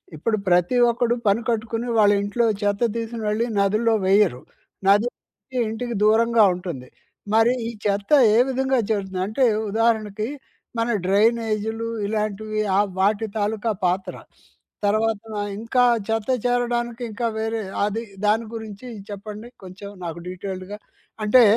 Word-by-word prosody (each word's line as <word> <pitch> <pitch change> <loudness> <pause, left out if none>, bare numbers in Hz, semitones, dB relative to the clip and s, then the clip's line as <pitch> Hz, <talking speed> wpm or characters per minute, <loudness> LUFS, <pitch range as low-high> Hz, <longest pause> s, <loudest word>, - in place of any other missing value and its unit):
ఇప్పుడు 215 +8 0
ప్రతి 180 +7 +3
ఒక్కడు 240 0 +1
పని 205 +4 +3
కట్టుకొని 225 +1 -2
వాళ్ళ 205 -1 +6
ఇంట్లో 230 +4 0 0.2
చెత్త 205 +1 0
తీసోకొనీ 230 -1 -4
వెళ్ళి 220 +3 0
నదుల్లో 215 +3 +2
వేయరు, 190 -10 +3 0.5
నది 205 +4 +5
అనేది 260 -1 -13
ఇంటికి 235 +1 -4
దూరంగా 225 +1 +4
ఉంటుంది. 170 -8 -6 0.5
మరి 225 +3 +5
ఈ - - -3
చెత్త 200 +4 -1 0.2
ఏ - - +5
విధంగా 265 0 +1
చేరుతుంది 190 -3 -1
అంటే 250 +5 +2 0.3
ఉదాహరణకి, 220 -1 0 0.5
మన 230 +1 0 0.2
డ్రైనేజీలు, 220 +2 +1 0.2
ఇలాంటివి 215 0 -2 0.2
ఆ - - +5 0.2
వాటి 210 +3 +2
తాలూకా 215 +2 0
పాత్ర. 185 +2 0 0.7
తర్వాత 215 0 +1 0.4
ఇంకా 245 +2 +2 0.3
చెత్త 225 +1 -1 0.2
చేరడానికి 240 0 0
ఇంకా 230 +3 -2
వేరే 225 0 -2 0.2
అది 215 +2 -2 0.3
దాని 225 +2 +2
గురించి 220 +2 -8 0.2
చెప్పండి 210 +3 -7 0.2
కొంచెం 190 +2 -9 0.2
నాకు 170 0 -5
డీటెయిల్డ్‌గా. 190 +2 -6 0.5
అంటే 245 +3 +7
220 Hz, 130 wpm, -23 LUFS, 200-230 Hz, 0.7 s, అంటే